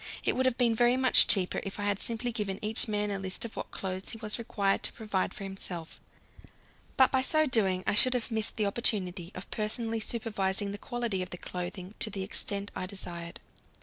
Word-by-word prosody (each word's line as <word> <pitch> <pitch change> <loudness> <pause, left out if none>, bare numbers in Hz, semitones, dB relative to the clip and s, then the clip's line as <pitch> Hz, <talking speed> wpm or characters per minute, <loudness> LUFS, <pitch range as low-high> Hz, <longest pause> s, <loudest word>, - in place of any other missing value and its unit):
It - - +1
would 260 0 +2
have 255 - 0
been 240 -2 +3
very 240 +2 +3
much 260 -1 +6
cheaper 185 -3 +3
if 195 0 -6
I - - -2
had 205 -1 +1
simply 240 +1 0
given 205 -4 -2
each 220 +3 +2
man 210 -1 -1
a 200 - -2
list 190 +3 -3
of 230 - -8
what - - -5
clothes 190 0 -5
he - - -6
was 215 0 -2
required 200 -4 0
to - - -2
provide 210 -4 -2
for - - -8
himself. 185 -4 -7 1.0
But 260 - +6
by 260 - +3
so 310 +4 +3
doing 195 -8 +3
I - - +1
should 255 +5 +6
have 245 0 -2
missed 220 -1 +1
the 215 - +2
opportunity 195 -4 0
of 185 - -8
personally 225 +1 -1
supervising 205 -3 +1
the 205 - -6
quality 235 -6 -2
of 185 - -4
the 180 - -6
clothing 180 +2 -6
to 220 - +2
the 195 -2 -4
extent 200 +1 -3
I 185 - -3
desired. 175 -3 -7
205 Hz, 215 wpm, -30 LUFS, 190-230 Hz, 1.0 s, much